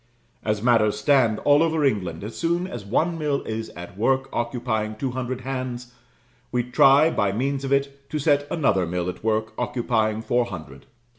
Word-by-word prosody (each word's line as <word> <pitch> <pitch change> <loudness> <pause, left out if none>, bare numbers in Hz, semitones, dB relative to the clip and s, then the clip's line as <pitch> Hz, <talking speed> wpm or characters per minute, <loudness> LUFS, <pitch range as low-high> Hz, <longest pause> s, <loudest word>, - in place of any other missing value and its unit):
As 105 -1 -1
matters 115 -4 +3
stand, 130 -7 +3
all 145 +1 +5
over 160 -2 +2
England, 95 -10 -1
as 110 +2 -7
soon 170 +2 0
as 120 - -7
one 165 - 0
mill 145 -2 -1
is 110 0 -4
at 90 +1 -9
work, 135 +3 +1
occupying 115 -3 -2
two 130 +4 -3
hundred 130 0 -4
hands, 125 -1 -5 0.6
we 125 -1 +1
try, 135 +5 +5
by 100 -1 +1
means 135 +6 -1
of 135 - -3
it, 140 0 -1
to 155 - -2
set 145 -1 +2
another 100 - +1
mill 90 +1 -2
at 90 - -8
work, 110 0 0
occupying 110 -3 0
four 120 +1 +1
hundred. 80 - -9
125 Hz, 175 wpm, -24 LUFS, 110-140 Hz, 0.6 s, all